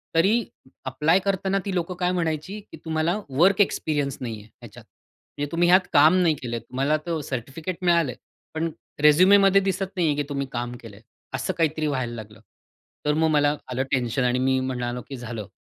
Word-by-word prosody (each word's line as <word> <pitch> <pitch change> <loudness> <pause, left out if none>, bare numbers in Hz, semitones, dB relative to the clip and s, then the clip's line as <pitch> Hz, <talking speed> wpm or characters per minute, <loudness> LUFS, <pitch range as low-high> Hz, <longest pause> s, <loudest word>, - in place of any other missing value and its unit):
तरी 210 +8 +3 0.4
अप्लाय 150 +7 +2
करताना 195 0 0
ती 195 - -2
लोकं 180 0 -2
काय 180 0 +1
म्हणायची 170 +3 -2
की - - -10
"तुम्हाला 160 +4 0
वर्क 185 +9 +4
एक्सपिरियन्स 145 -7 0
नाही 115 -4 -5
आहे 105 - -17
ह्याच्यात. - - -12 0.5
म्हणजे 145 0 -3
तुम्ही 175 +1 +2
ह्यात 185 +1 +5
काम 155 +4 +6
नाही 165 -3 +3
केलं 120 -2 -4
आहे. 115 - -5
तुम्हाला 135 +4 0
तर 165 -2 -2
सर्टिफिकेट 140 +8 -5
मिळालं 170 -6 +3
आहे, - - -12 0.4
पण 160 +1 -2 0.3
रेझ्युमीमध्ये 195 +5 +6
दिसत 195 0 -1
नाही 175 -3 +1
आहे 145 - +1
की 145 - 0
तुम्ही 140 -1 -3
काम 120 0 -4
केलं 110 -4 -11
आहे." 110 - -17 0.3
असं 130 - -2
काहीतरी 155 -2 0
व्हायला 130 -4 -2
लागलं. 110 0 -10 0.7
तर 150 - +2
मग 160 +1 +2
मला 145 0 +3 0.2
आलं 130 +2 0
टेन्शन 125 0 0
आणि 125 0 +1
मी 130 0 +2
म्हणालो 125 -1 -3
की 135 - -5
"झालं, 115 -4 -6
150 Hz, 190 wpm, -24 LUFS, 130-175 Hz, 0.7 s, काम